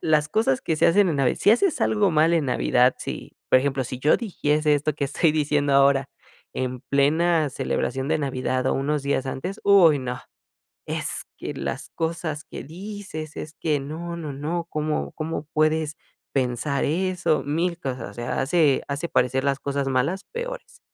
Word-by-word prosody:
las 150 -1 +2
cosas 150 - +1
que 160 - -1
se - - +4
hacen 195 +3 +4
en 160 - 0
Navi 135 -3 +2
si - - +4
haces 315 - +3
algo 210 -3 +2
mal 160 +1 +4
en 160 - +2
Navidad, 125 0 +3
si, - - -6 0.2
por - - +6
ejemplo, 135 0 0
si 125 0 -6
yo 150 +4 +3
dijiese 150 -8 +1
esto 150 +1 0
que 145 - -1
estoy 150 +3 +2
diciendo 145 -2 +1
ahora, 140 0 +4 0.4
en 125 -1 -3
plena 155 +3 +3
celebración 135 0 -2
de 160 0 +2
Navidad 130 -2 -1
o - - +2
unos 145 +2 -1
días 140 -2 0
antes, 135 +9 -4
uy, 180 -7 +6
no, 125 -1 -4 0.7
"Es - - -3
que - - -5
las - - -5
cosas 160 -2 -3
que - - -8
dices 180 -2 -8
es 155 0 -7
que 150 -1 0
no, 165 +5 -6
no, 155 -4 -5
no, 160 +5 -3
¿cómo 150 0 -2
cómo 155 -1 -4
puedes 155 0 +1 0.4
pensar 130 +2 0
eso?", 180 +1 +1
1000 170 +4 -1
cosas, 125 -5 -4
o - - -18
sea, 120 +1 -3
hace 145 0 +3
hace 145 +4 -3
parecer 125 -1 +1
las 140 0 +1
cosas 140 0 -2
malas, 135 +9 0
peores. - - -6
150 Hz, 180 wpm, -24 LUFS, 135-170 Hz, 0.7 s, por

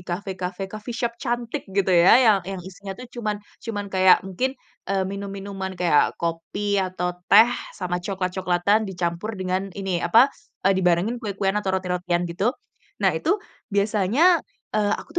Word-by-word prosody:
cafe-cafe, 185 0 -4
coffee 215 +3 -6
shop 235 -2 -1
cantik 240 +2 -2
gitu 190 -1 +1
ya, 175 +1 +7
yang 215 -3 +6
yang 195 -2 -4
isinya 195 +1 -8
tuh 250 - -7
cuman, 215 -3 -2 0.3
cuman 205 -3 -3
kayak 185 0 +6
mungkin, 195 +8 -1 0.4
eee, 195 -1 +1
minum-minuman 195 -1 -5
kayak 175 -4 +3
kopi 195 +5 -1
atau 180 -1 -2 0.2
teh 220 +4 +8 0.3
sama 180 -1 -2
cokelat-cokelatan 190 +2 0
dicampur 180 +3 -3
dengan 185 +1 -2
ini 190 -3 -2
apa, 250 +9 +5 0.3
eee, 195 - +5
dibarengin 185 +6 +1
kue-kuean 200 -3 -1
atau 190 -1 0
roti-rotian 180 -1 -1
gitu. 195 - -1 0.5
Nah, 190 - +5
itu 320 - +1 0.3
biasanya, 215 - +3 0.3
eee, 210 -1 +1
aku - - -11
195 Hz, 145 wpm, -24 LUFS, 180-210 Hz, 0.5 s, teh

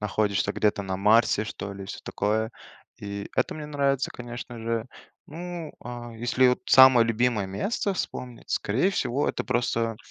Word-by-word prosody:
находишься 100 -1 0
где-то 105 -1 +1
на 95 -1 -3
Марсе 105 +2 +4
что 105 -1 -6
ли 100 0 -8
и - - -11
всё - - -6
такое. 110 +2 -1 0.5
И 100 0 -6
это - - +1
мне 155 -1 -6
нравится, 140 -2 0
конечно 120 0 -8
же. 115 0 -2 0.4
Ну 170 0 -7
а, 120 -1 -7
если 120 +3 +3
вот 125 - +1
самое 130 -3 +8
любимое 115 -2 +1
место 195 - -2
вспомнить, 125 -8 -6
скорее 130 - +1
всего, 145 -7 0
это - - -2
просто 115 -2 0
115 Hz, 160 wpm, -26 LUFS, 105-130 Hz, 0.5 s, самое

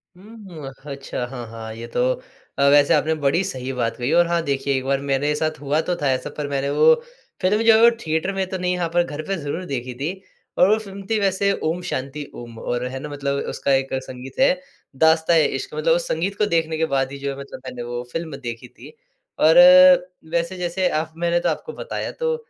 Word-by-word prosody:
हुँ, 190 -7 -11 0.2
अच्छा 135 -2 -4
हाँ, 120 -2 -7
हाँ 110 -1 -8
ये 115 +1 -8
तो 125 - -2 0.6
अ, - - +2
वैसे 145 0 +5
आपने 160 +1 +2
बड़ी 155 +7 +2
सही 130 -7 -4
बात 120 -2 -1
कही 125 +3 -2
और 175 0 +5
हाँ 170 0 +1
देखिए 140 -1 -1
एक 130 - -3
बार 135 0 +1
मेरे 140 +1 0
साथ 155 -1 -2
हुआ 145 +3 +1
तो 175 - +1
था 145 - +1
ऐसा 130 +3 -2
पर 145 -1 -3
मैंने 140 0 -1
वो 475 - +6 0.5
फ़िल्म 205 +4 +2
जो 225 -1 +7
है 220 - +4
वो 235 - +9 0.2
थिएटर 160 +4 0
में 190 -1 -1
तो 190 - -3
नहीं 180 0 -1
हाँ, 170 -1 0
पर 175 +1 +2
घर 155 -3 -6
पे 195 - 0
ज़रूर 165 +4 -4
देखी 130 -3 -4
थी 140 +7 -3 0.5
और 185 - +5
वो 215 - +4
फ़िल्म 195 -2 -9
थी 220 -1 +2
वैसे 200 0 +1
ओम 165 +3 -1
शांति 140 +3 -4
ओम 120 -1 -10
और 120 +1 -2
है 130 +1 -6
ना 150 +1 -7
मतलब 140 -1 -2
उसका 140 - -1
एक 135 0 0
संगीत 130 - -10
है, 270 0 +4 0.4
दास्ता 160 +3 +4
ए 155 -2 +5
इश्क़, 395 - -4
मतलब - - +2
उस - - -2
संगीत 200 - -1
को 210 - +2
देखने 165 -4 0
के 160 - +1
बाद 135 0 +1
ही 140 - -6
जो 140 0 -3
है - - -10
मतलब 140 - -9
मैंने 125 -1 -6
वो 120 0 -4
फ़िल्म 160 -4 -4
देखी 120 -2 -7
थी 460 - -15 0.5
और 160 +1 +5 0.7
वैसे 170 +2 -1
जैसे 180 +1 -1
आप 155 +1 -2
मैंने 170 0 +1
तो - - 0
आपको 470 - -4
बताया। - - -5
तो 480 -1 -1
155 Hz, 230 wpm, -22 LUFS, 135-185 Hz, 0.7 s, वो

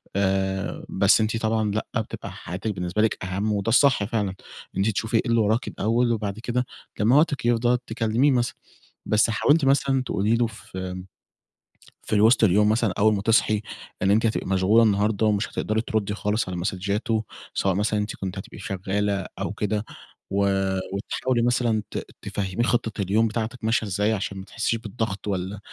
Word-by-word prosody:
آآ 95 -1 -1
بس - - +4
أنتِ 110 +1 0
طبعًا 110 -1 0
لأ، 110 +2 -2
بتبقى - - -7
حياتِك 95 +6 -5
بالنسبة 90 +2 -1
لِك 110 -3 0
أهم، 95 +3 -1
وده 100 +1 -1
الصح 130 -1 +4
فعلًا، 105 -2 -1
إن 95 - -7 0.4
أنتِ 100 +3 +2
تشوفي 110 +2 0
إيه - - +3
إللي 115 0 +3
وراكِ 110 +4 +1
الأول، 115 +3 +1
وبعد 105 -2 -2
كده 125 +2 -1 0.3
لما 115 +5 +4
وقتِك 145 -4 +2
يفضى 120 +1 +3
تكلميه 115 +5 +2
مثلًا. 120 -2 0 0.5
بس 110 +1 +3
حاولتِ 145 +7 +3
مثلًا 135 -1 +2
تقولي 105 -1 +1
له، 120 0 +2
في 110 -4 -12
آمم 95 0 -4 1.0
في - - -5
الوسط 110 +3 +5
اليوم 105 +2 +4
مثلًا، 110 -3 +1
أول 110 +1 +5
ما 100 - -1
تصحي، 110 0 +3 0.4
إن 95 - +3
أنتِ 110 +2 +3
هتبقي 110 - 0
مشغولة 95 +4 +4
النهاردة، 105 0 +2
ومش 105 -1 +1
هتقدري 110 +1 -1
تردّي 110 -3 -1
خالص 105 -1 -1
على 90 - -4
مسدجاته، 100 +4 -1 0.3
سواء 95 -2 +1
مثلًا 105 +1 +1
أنتِ 105 +1 -3
كنتِ 95 0 -5
هتبقي 95 - -9
شغّالة 100 0 -2
أو - - -2
كده، 105 +1 -2 0.5
و 100 - -1 0.6
وتحاولي 120 +4 -1
مثلًا 120 -3 +1
ت - - -4 0.2
تفهميه 95 +3 -2
خطة 115 -3 0
اليوم 105 +4 +2
بتاعتِك 110 +2 -4
ماشية 110 -1 +1
إزاي، 105 +3 +1
عشان 95 -2 -3
ما 95 - -7
تحسّيش 115 +2 -1
بالضغط، 110 -2 -4
والّا 95 0 -3
110 Hz, 175 wpm, -24 LUFS, 100-115 Hz, 1.0 s, الوسط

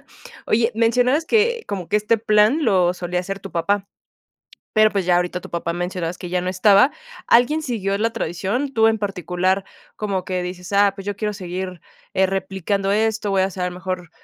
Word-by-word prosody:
asada. - - -27 0.4
Oye, 230 +1 +2
mencionabas 245 +7 +2
que 465 +1 +2
como 185 -4 -5
que - - +2
este 210 +2 +1
plan 215 +7 +3
lo 180 -5 +3
solía 180 0 -2
hacer 195 +2 -5
tu 195 - -9
papá. 200 +4 0 0.9
Pero, 215 -1 +5
pues, 200 -3 -1
ya 175 - +4
ahorita 180 0 -1
tu - - -11
papá, 170 0 -2
mencionabas 175 0 -3
que 180 - -7
ya 180 - 0
no 180 - -3
estaba. 200 +6 +5 0.4
Alguien 295 +7 +4
siguió 200 -7 -1
la 225 +2 0
tradición, 230 - -2
tú 225 0 +5
en 220 -1 +1
particular, 190 -1 -1 0.3
como 195 -3 -2
que 185 -1 -2
dices: 180 +1 -7
"Ah 200 0 +4
pues 195 - -8
yo 205 - -2
quiero 210 0 -2
seguir, 185 -2 -6 0.3
eh, 190 - +3
replicando 195 +1 -2
esto, 215 0 +1
voy 190 -1 +2
a - - +3
hacer 185 -1 -2
mejor, 180 -1 -5
195 Hz, 195 wpm, -21 LUFS, 180-215 Hz, 0.9 s, Pero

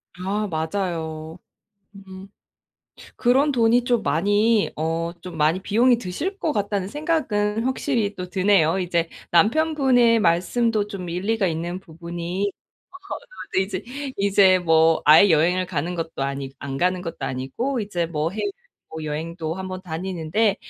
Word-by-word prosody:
아 200 +4 -2
맞아요. 160 -2 -3 0.6
음 190 0 -11 0.9
그런 270 +4 +3
돈이 240 0 +3
좀 240 -3 +1
많이 205 +7 +2
어 165 +2 -2
좀 180 -3 -8
많이 155 +5 +2
비용이 235 +4 +3
드실 290 - -4
것 310 - -1
같다는 200 -2 -1
생각은 230 -8 -1
확실히 245 -5 -1
또 180 -1 -5
드네요. 185 -2 +3
이제 170 -2 0 0.2
남편분의 245 - +4
말씀도 210 +4 +1
좀 185 -4 -6
일리가 195 +4 0
있는 170 +2 -3
부분이 175 +3 -4
어 - - -70 0.9
네, 190 - +4
이제 190 0 -4 0.3
이제 195 -2 +4
뭐 160 -1 +3
아예 160 +6 +7
여행을 175 +4 +3
가는 170 +1 -3
것도 165 -4 -4
아니 135 0 -3
안 135 -1 -5
가는 180 +2 +1
것도 165 - -6
아니고 225 - -2
이제 180 -5 -2
뭐 160 0 -2
해외 220 - -2 0.4
뭐 160 0 -7
여행도 160 +2 -4
한번 185 -1 -5
다니는데 185 +4 -1
185 Hz, 270 characters per minute, -23 LUFS, 165-215 Hz, 0.9 s, 아예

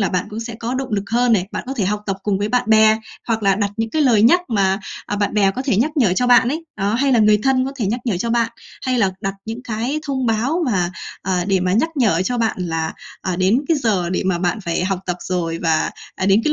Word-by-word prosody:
là 195 - +2
bạn 180 +2 -1
cũng 220 +2 -5
sẽ 230 0 -6
có 235 +3 -4
động 265 0 -3
lực 200 -1 0
hơn 240 0 +3
này. 190 -3 +2
Bạn - - -4
có 270 - -4
thể 205 - 0
học 210 +2 -1
tập 195 -1 -1
cùng 200 -2 0
với 205 +1 -1
bạn 245 -2 0
bè 220 0 +6 0.3
hoặc 225 -1 0
là 195 -1 +4
đặt 200 0 -1
những 225 0 -2
cái 310 - +1
lời 230 -6 +4
nhắc 350 +10 +6
mà, 195 -3 +1 0.3
à, 205 - -2
bạn 205 0 -1
bè 200 -2 +4
có 255 +7 -4
thể 255 -8 +1
nhắc 270 +8 +2
nhở 220 -10 +3
cho 250 - +1
bạn 245 -1 +5
ấy. 320 +4 -3
Đó. 200 +2 0
Hay 270 +2 +2
là 235 - +4
người 210 -1 +5
thân 260 -1 +2
có 270 - -4
thể 220 -6 -1
nhắc 235 +5 -1
nhở 215 -7 0
cho 230 +4 -2
bạn 235 -1 +1 0.3
hay 255 -1 0
là 195 -4 +3
đặt 195 0 -2
những 225 +3 -6
cái 240 +6 -2
thông 260 -3 -1
báo 250 +10 0
mà, 180 -6 +1 0.3
à, 180 -1 0
để 190 -2 +2
mà 180 0 0
nhắc 240 +11 +2
nhở 205 -9 +2
cho 245 +2 -1
bạn 225 -1 0
là, 165 -2 -2 0.3
à, 185 -2 -2
đến 195 +8 +3
cái 325 - +3
giờ 200 -9 0
để 185 - 0
mà 180 -2 +1
bạn 180 +5 0
phải 175 -1 -1
học 190 -1 -1
tập 180 -1 -1
rồi 165 -2 -2
và, 160 -1 +1 0.2
à, 190 - -2
đến 200 +3 +5
cái 300 - +2
215 Hz, 285 wpm, -20 LUFS, 190-245 Hz, 0.3 s, bè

